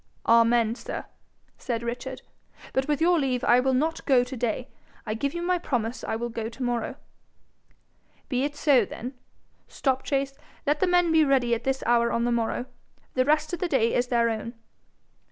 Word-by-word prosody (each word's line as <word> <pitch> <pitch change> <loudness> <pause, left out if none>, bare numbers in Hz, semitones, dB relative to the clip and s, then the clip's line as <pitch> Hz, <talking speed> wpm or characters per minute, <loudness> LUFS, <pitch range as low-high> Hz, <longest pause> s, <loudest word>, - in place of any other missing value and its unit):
'Amen, 230 -1 +4
sir!' 240 - -6 0.5
said 235 -2 -3
Richard. 250 +2 -5 0.5
'But 265 0 0
with 295 0 0
your 345 0 +4
leave 255 -3 0
I 240 - +5
will 260 +1 +2
not 315 +5 0
go 260 -4 +5
to 250 +2 -7
day. 240 0 -2 0.4
I 215 - -2
give 280 +8 -2
you 345 - -3
my 360 0 +1
promise 240 -7 -2
I - - -2
will 240 +1 -3
go 225 -1 -4
to 245 +3 -7
morrow.' 240 -1 -1 1.3
'Be 255 -1 0
it 290 +1 -2
so, 285 -5 +4
then. 245 +5 -7 0.5
Stopchase, 270 0 -1 0.3
let 295 +1 +1
the 375 - +2
men 355 -1 +3
be 320 -1 +5
ready 265 -4 +2
at 235 0 -2
this 265 0 0
hour 235 0 +3
on 235 - 0
the 240 - +1
morrow. 235 +1 -1 0.5
The 255 0 +2
rest 305 +3 +1
of 350 - -2
the 360 - 0
day 235 -7 +2
is 245 - +1
their 235 -2 +2
own.' 230 +2 -5
255 Hz, 190 wpm, -26 LUFS, 235-285 Hz, 1.3 s, I